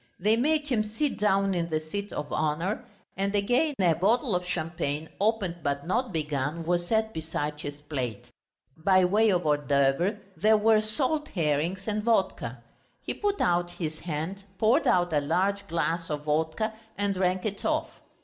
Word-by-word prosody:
They 210 Hz, +4 st, +3 dB
made 300 Hz, +5 st, +1 dB
him 240 Hz, -6 st, +1 dB
sit 225 Hz, +7 st, -2 dB
down 195 Hz, -1 st, +2 dB
in 170 Hz, -2 st, -1 dB
the 155 Hz, -1 st, 0 dB
seat 200 Hz, +6 st, -5 dB
of 145 Hz, -, -4 dB
honour, 155 Hz, +6 st, -1 dB, 0.3 s
and 200 Hz, +1 st, -1 dB
again 245 Hz, +9 st, +2 dB
a 175 Hz, -3 st, +4 dB
bottle 215 Hz, -, +2 dB
of 180 Hz, -, 0 dB
champagne, 160 Hz, -3 st, -3 dB
opened 205 Hz, -5 st, +1 dB
but 140 Hz, -1 st, -2 dB
not 235 Hz, +6 st, 0 dB
begun, 150 Hz, 0 st, -2 dB
was 175 Hz, 0 st, 0 dB
set 220 Hz, +1 st, +1 dB
beside 150 Hz, -2 st, -3 dB
his 145 Hz, 0 st, -7 dB
plate. 130 Hz, -8 st, -4 dB, 0.4 s
By 185 Hz, +3 st, +4 dB
way 215 Hz, +4 st, +4 dB
of 180 Hz, -4 st, +1 dB
hors 145 Hz, -2 st, +1 dB
d'oeuvres 140 Hz, -, +2 dB, 0.2 s
there 215 Hz, +6 st, +4 dB
were 215 Hz, 0 st, +4 dB
salt 275 Hz, +8 st, 0 dB
herrings 170 Hz, -, -1 dB
and 215 Hz, 0 st, 0 dB
vodka. 190 Hz, -, 0 dB, 0.4 s
He -, -, -3 dB
put 405 Hz, -1 st, -1 dB
out 175 Hz, 0 st, +2 dB
his 155 Hz, -3 st, -5 dB
hand, 170 Hz, +4 st, -4 dB
poured 230 Hz, -, +3 dB
out 175 Hz, -2 st, +3 dB
a 150 Hz, -, +4 dB
large 200 Hz, +7 st, 0 dB
glass 165 Hz, 0 st, -1 dB
of 150 Hz, -1 st, -3 dB
vodka 160 Hz, +8 st, 0 dB, 0.2 s
and 200 Hz, 0 st, +1 dB
drank 185 Hz, 0 st, 0 dB
it 205 Hz, -2 st, -3 dB
off. -, -, -1 dB
180 Hz, 170 wpm, -27 LUFS, 155-215 Hz, 0.4 s, a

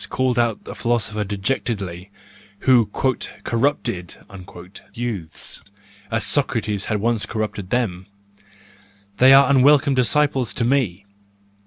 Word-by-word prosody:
called 130 Hz, -2 st, 0 dB
out 115 Hz, -2 st, +1 dB
a -, -, -7 dB
philosopher 110 Hz, -3 st, -1 dB
dejectedly, 100 Hz, -3 st, -3 dB, 0.5 s
who 125 Hz, -5 st, +4 dB
"corrupted" 115 Hz, -, -2 dB, 0.8 s
youths, 105 Hz, -10 st, -5 dB, 0.5 s
as 115 Hz, 0 st, -1 dB
Socrates 110 Hz, -7 st, -1 dB
had 105 Hz, -2 st, -1 dB
once 115 Hz, 0 st, 0 dB
corrupted 105 Hz, -4 st, -4 dB
them,—they 100 Hz, +1 st, -3 dB
are 135 Hz, +1 st, +7 dB
unwelcome 140 Hz, +1 st, +4 dB
disciples 130 Hz, 0 st, +1 dB
to 120 Hz, -, -1 dB
me. 115 Hz, -8 st, 0 dB
110 Hz, 100 wpm, -21 LUFS, 100-125 Hz, 0.8 s, are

